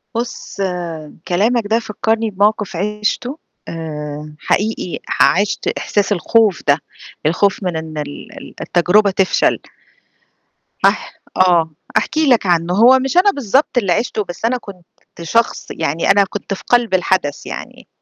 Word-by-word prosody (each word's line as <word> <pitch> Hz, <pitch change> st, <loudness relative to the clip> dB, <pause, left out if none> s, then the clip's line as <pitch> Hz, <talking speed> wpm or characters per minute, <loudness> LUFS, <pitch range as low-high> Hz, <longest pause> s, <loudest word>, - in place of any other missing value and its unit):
بُص، 235 Hz, -3 st, -5 dB, 0.7 s
كلامك 220 Hz, +6 st, +2 dB
ده 225 Hz, +2 st, +2 dB
فكّرني 225 Hz, 0 st, -1 dB
بموقِف 205 Hz, -1 st, 0 dB
عِشته 210 Hz, -, -2 dB, 0.3 s
آآ، 150 Hz, -2 st, -6 dB
حقيقي 205 Hz, -3 st, -1 dB, 0.2 s
عِشت 200 Hz, +2 st, +2 dB
إحساس 205 Hz, 0 st, -1 dB
الخوف 205 Hz, +1 st, +2 dB
ده، 145 Hz, +2 st, +4 dB, 0.5 s
الخوف 195 Hz, +5 st, +1 dB
من 175 Hz, -3 st, -1 dB
إن 160 Hz, -1 st, -7 dB
ال 145 Hz, -1 st, -6 dB
ال -, -, -11 dB
التجربة 195 Hz, +4 st, +3 dB
تفشل. 190 Hz, 0 st, +2 dB, 1.3 s
هاح -, -, 0 dB, 0.2 s
آه 170 Hz, -4 st, +3 dB, 0.2 s
أحكي 315 Hz, -2 st, +1 dB
لك 240 Hz, -5 st, +4 dB
عنه 175 Hz, -1 st, +1 dB
هو 245 Hz, +6 st, +6 dB
مش 270 Hz, +6 st, -2 dB
أنا 395 Hz, +3 st, +6 dB
بالضبط 270 Hz, -, 0 dB
اللي 195 Hz, -7 st, +2 dB
عِشته 215 Hz, -1 st, -1 dB
بس 175 Hz, +4 st, -6 dB
أنا 250 Hz, +2 st, +1 dB
كنت 195 Hz, -6 st, -12 dB, 0.4 s
شخص 230 Hz, +8 st, 0 dB
يعني 160 Hz, +3 st, 0 dB
أنا 200 Hz, 0 st, +5 dB
كنت 200 Hz, +1 st, -5 dB
في 195 Hz, -, -8 dB
قلب 240 Hz, -4 st, +2 dB
الحدث 185 Hz, -5 st, 0 dB
يعني، -, -, -8 dB
200 Hz, 135 wpm, -17 LUFS, 175-225 Hz, 1.3 s, هو